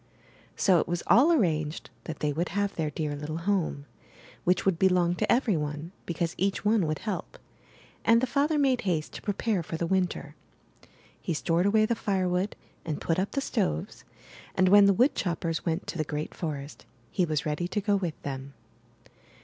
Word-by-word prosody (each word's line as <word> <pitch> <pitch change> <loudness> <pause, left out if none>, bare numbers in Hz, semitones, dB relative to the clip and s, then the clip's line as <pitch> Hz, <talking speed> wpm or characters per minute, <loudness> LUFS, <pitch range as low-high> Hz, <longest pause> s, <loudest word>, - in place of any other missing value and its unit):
So 185 -4 +4
it - - -1
was 175 0 -2
all 250 - +6
arranged 160 - 0
that 160 -2 -6
they 150 -1 +1
would 165 +4 -1
have 200 +2 -1
their 160 -2 -1
dear 150 0 -3
little 150 +2 -5
home, 170 -5 -1 0.6
which 180 +1 +2
would 185 -4 +2
belong 180 -2 +3
to 215 - +1
every 235 -5 +3
one, 150 +2 -4 0.2
because 170 -1 -1
each 195 +2 0
one 210 -5 +3
would 155 0 -1
help; 195 -5 -5 0.7
and 230 0 +5
the 255 - +1
father 290 +4 +1
made 270 -4 +2
haste 165 -6 -1
to - - -7
prepare 205 -1 -1
for 165 0 -5
the 170 - -1
Winter. 185 +1 -1 0.9
He 170 - -2
stored 170 +5 +1
away 215 +1 +4
the 235 - +1
firewood 190 -3 0 0.3
and 155 -3 -3
put 165 +1 0
up 195 - -2
the 275 - 0
stoves; 80 - -2 0.5
and 185 0 +4
when 205 +1 +8
the 200 - +5
wood 255 +7 +4
choppers 165 -3 -2
went 165 +2 -1
to 170 - -5
the - - +2
great 150 0 -4
forest, 145 -3 -6 0.2
he 185 - +1
was 155 -3 -1
ready 155 +3 -1
to 210 - -1
go 205 0 +1
with 180 -5 -2
them. 135 0 -6
175 Hz, 190 wpm, -28 LUFS, 155-205 Hz, 0.9 s, when